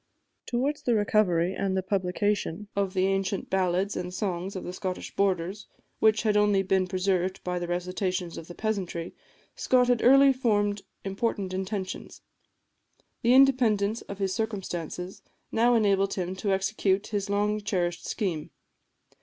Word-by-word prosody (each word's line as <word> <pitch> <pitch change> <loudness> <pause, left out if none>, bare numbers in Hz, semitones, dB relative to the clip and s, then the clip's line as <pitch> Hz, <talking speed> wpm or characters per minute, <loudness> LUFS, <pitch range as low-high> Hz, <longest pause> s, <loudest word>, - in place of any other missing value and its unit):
Towards 275 +5 -1
the 240 - +1
recovery 190 -4 +2
and 190 -1 -1
publication 205 0 -1
of 200 -1 -1
the 185 0 +3
ancient 195 0 -1
ballads 190 +1 +1
and 180 0 -4
songs 185 0 -3
of 185 - -4
the 180 - -6
Scottish 185 0 -5
borders, 190 +1 0 0.3
which 220 0 +4
had 215 -2 +2
only 205 -2 +3
been 190 -1 +1
preserved 185 0 -1
by 180 0 -2
the 175 - -4
recitations 180 0 -2
of 165 - -8
the 175 - -10
peasantry, 190 -6 -3 0.4
Scott 250 -1 +3
had 245 -2 +3
early 275 +2 +7
formed 205 -5 +1 0.2
important 195 -1 -2
intentions. 190 0 -4 1.0
The 240 +2 +4
independence 230 -6 +4
of 200 - -8
his 195 -1 -1
circumstances 190 -5 -4 0.3
now 240 +2 +3
enabled 195 -3 +2
him 185 0 -3
to 200 0 -1
execute 195 0 +1
his 200 -1 -1
long 210 +1 +1
cherished 175 -4 -2
scheme. 175 -9 -2
195 Hz, 145 wpm, -27 LUFS, 185-210 Hz, 1.0 s, early